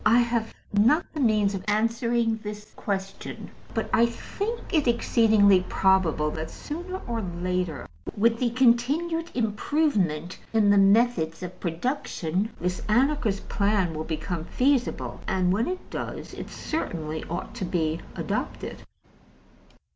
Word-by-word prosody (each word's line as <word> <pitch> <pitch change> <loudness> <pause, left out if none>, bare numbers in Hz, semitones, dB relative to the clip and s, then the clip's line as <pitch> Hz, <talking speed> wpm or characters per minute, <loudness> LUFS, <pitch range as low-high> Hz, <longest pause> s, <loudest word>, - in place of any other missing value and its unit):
I 220 +2 +5
have 235 -2 0 0.2
not 240 - +4
the 305 - -4
means 215 -5 +3
of 190 -1 -4
answering 230 +1 +1
this 210 0 -7
question, 195 -1 -5 0.2
but - - 0
I 235 +1 +5
think 405 - -4
it 305 -5 +3
exceedingly 220 -5 +4
probable 180 -6 +3
that, 160 +1 -5
sooner 360 +5 -6
or 230 -1 -2
later, 180 -2 -2 0.3
with 230 +2 +3
the 245 - +2
continued 265 +8 +2
improvement 210 - 0
in 210 -2 +4
the 205 - +6
methods 195 -5 +3
of 180 0 -7
production, 185 - -2
this 180 +1 -2
Anarchist 240 -3 +2
plan 200 -4 +1
will 155 0 -3
become 165 +1 -3
feasible; 260 +2 0
and 185 -1 +2
when 220 +5 +1
it 365 0 -4
does, - - -5
it - - -7
certainly 160 - -3
ought 170 - -4
to 190 - -4
be 165 -3 0 0.2
adopted. - - -3
210 Hz, 130 wpm, -26 LUFS, 180-240 Hz, 0.3 s, the